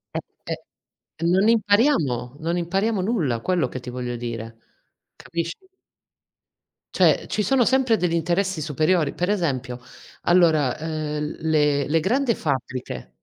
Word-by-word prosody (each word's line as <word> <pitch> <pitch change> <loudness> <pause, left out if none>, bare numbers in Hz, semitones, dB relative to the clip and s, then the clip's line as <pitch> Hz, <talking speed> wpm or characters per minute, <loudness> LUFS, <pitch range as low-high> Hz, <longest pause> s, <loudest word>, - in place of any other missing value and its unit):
Eh, - - +1 0.3
eh, - - -7 0.7
non 195 +4 +4
impariamo, 205 - +2
non 170 +2 -1
impariamo 195 +4 0
nulla, 170 - 0
quello 180 +4 0
che 130 - -6
ti 125 - -11
voglio 125 -1 -4
dire. 115 -1 -6 0.6
Capisci? 170 0 -4 1.4
Cioè, - - +4
ci 210 - -1
sono 260 -1 +3
sempre 260 -4 +3
degli 175 -2 0
interessi 175 +1 0
superiori. 155 +2 +1
Per 180 +2 -1
esempio, 130 -10 -2 0.4
allora, 160 -7 +3
uhm, 155 -1 -3
le 150 -3 +2
le 160 +2 +2
grande 240 - +1
fabbriche 130 - -4
160 Hz, 125 wpm, -23 LUFS, 135-195 Hz, 1.4 s, non